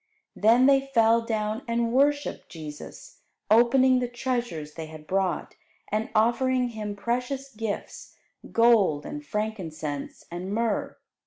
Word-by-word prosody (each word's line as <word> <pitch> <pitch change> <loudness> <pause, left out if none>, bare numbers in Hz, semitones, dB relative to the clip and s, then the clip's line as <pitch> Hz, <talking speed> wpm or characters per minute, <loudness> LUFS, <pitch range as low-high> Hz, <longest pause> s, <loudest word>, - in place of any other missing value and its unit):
Then 230 +4 +5
they 275 0 +6
fell 230 -4 +3
down 220 -1 -2
and 235 0 0
worshipped 285 +3 +1
Jesus, 150 -3 -10 0.3
opening 255 +3 +5
the 250 - -1
treasures 240 - -3
they 160 0 -7
had 155 -1 -11
brought, 190 +1 -1 0.4
and 215 +4 -1
offering 250 +3 +2
Him 210 -3 -5
precious 250 +5 -3
gifts, 215 -1 -5 0.4
gold 215 -11 +4
and 295 0 -6
frankincense 170 - -4
and 180 +3 -5
myrrh. 225 0 -1
225 Hz, 125 wpm, -26 LUFS, 195-250 Hz, 0.4 s, they